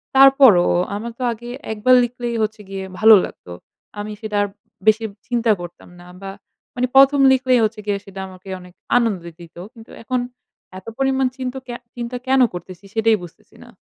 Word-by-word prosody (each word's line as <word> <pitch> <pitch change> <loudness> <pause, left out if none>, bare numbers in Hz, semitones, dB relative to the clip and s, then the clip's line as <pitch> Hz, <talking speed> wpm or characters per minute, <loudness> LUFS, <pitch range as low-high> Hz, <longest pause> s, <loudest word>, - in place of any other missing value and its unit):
তারপরও 265 -9 +7 0.3
আমার 230 +3 -5
তো - - -3
আগে 240 +2 -11 0.2
একবার 220 +4 +4
লিখলেই 240 0 -4
হচ্ছে 215 0 -4
গিয়ে 195 -1 -5 0.2
ভালো 220 0 +8
লাগতো। 90 - -12 0.5
আমি 210 +1 -5
সেটা 215 -2 -3
আর - - -1 0.4
বেশি 215 +1 +4 0.2
চিন্তা 235 -2 +1
করতাম 175 0 -11
না 175 - -14 0.2
বা 195 0 -6 0.4
মানে 250 +1 0
১ম 275 +1 +6
লিখলেই 255 -1 +2
হচ্ছে 215 0 -4
গিয়ে 205 -1 0
সেটা 195 -1 -10
আমাকে 185 +1 -13
অনেক 180 0 -15 0.2
আনন্দ 220 -7 0 0.2
দিত। 170 -2 -14 0.2
কিন্তু 225 -1 -15
এখন 250 +2 -1 0.6
এত 190 - -24
পরিমাণ 265 -1 +1
চিন্ত 255 -1 -4
কে 245 - -6 0.2
চিন্তা 240 +1 -5
কেন 265 0 +4
করতেছি 185 +2 -9
সেটাই 220 0 +3
বুঝতেছি 175 - -15
না। - - -16
225 Hz, 175 wpm, -20 LUFS, 195-250 Hz, 0.6 s, ভালো